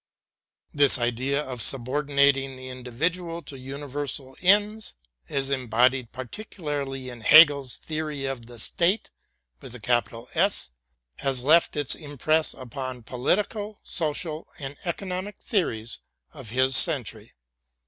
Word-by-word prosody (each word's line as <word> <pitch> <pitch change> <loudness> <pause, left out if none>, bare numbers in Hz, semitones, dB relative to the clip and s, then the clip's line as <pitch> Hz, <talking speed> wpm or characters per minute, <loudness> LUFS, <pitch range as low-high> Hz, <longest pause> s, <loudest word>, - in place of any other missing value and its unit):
This 145 -1 +7
idea 130 +4 0
of 125 -4 0
subordinating 135 +1 +2
the 130 0 -8
individual 165 +8 -3
to 140 - -8
universal 135 0 -5
ends, 210 +3 +2 0.3
as 135 0 -1
embodied 125 -1 +1
particularly 140 - -5
in 120 -2 -9
Hegel's 140 -1 +6
theory 155 -3 -4
of 130 -4 -5
the 120 -1 -11
State, 180 - +1 0.5
has 125 - 0 0.8
left 160 +2 +4
its 145 -2 +1
impress 155 +1 0
upon 130 -1 -7
politi 130 - +1
cal, 210 -1 -7
social, 155 0 -3
and 140 -2 -7
economic 185 +2 -4
theories 120 - -2 0.3
of 135 -8 -10
his 130 +2 +2
century. 115 - +1
140 Hz, 105 wpm, -25 LUFS, 125-160 Hz, 0.8 s, This